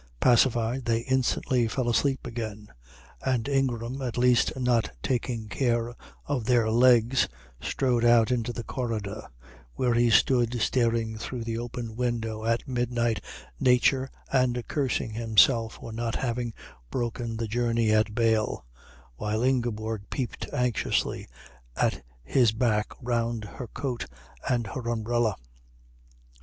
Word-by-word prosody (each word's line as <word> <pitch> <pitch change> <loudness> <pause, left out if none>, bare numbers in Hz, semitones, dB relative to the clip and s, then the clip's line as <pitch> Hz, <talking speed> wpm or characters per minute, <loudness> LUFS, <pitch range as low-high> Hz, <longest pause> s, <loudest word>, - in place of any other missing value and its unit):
Pacified, 120 - +3
they 115 -1 +1
instantly 130 -1 +1
fell 125 +2 -2
asleep 135 +3 +1
again; 110 -3 -6 0.5
and 130 -2 0
Ingram, 130 -2 -1
at 125 -3 -3
least 125 0 +4
not 120 -3 +2
taking 120 -3 -1
care 120 0 0 0.3
of 135 -6 -2
their 115 -2 +3
legs, 120 +1 +4 0.3
strode 125 - 0
out 120 0 +5
into 120 -1 0
the 120 -1 -5
corridor, 110 -6 -4 0.5
where 125 -2 +1
he 120 0 +3
stood 120 +1 +3
staring 115 -3 +1
through 120 +1 -5
the 115 0 -3
open 120 -1 -5
window 115 -3 -2
at 115 0 0
midnight 120 -4 0 0.4
nature 130 +1 +3 0.2
and 125 -2 +1
cursing 135 -5 -1
himself 115 +1 +3
for 115 - -9
not 115 0 -2
having 120 -2 -2 0.4
broken 120 - -3
the 115 0 -2
journey 115 0 +1
at 110 0 +2
Bâle, 110 -2 +1 0.5
while 110 +2 -1
Ingeborg 115 -5 -1
peeped 130 -4 -4
anxiously 125 -3 0 0.5
at - - 0 0.2
his 120 - +3
back 110 -2 +1 0.2
round 115 -2 -1
her 120 +4 -8
coat 125 +1 -4 0.4
and 120 -2 +1
her 115 +4 -5
umbrella. 115 -1 0
120 Hz, 125 wpm, -27 LUFS, 115-125 Hz, 0.5 s, out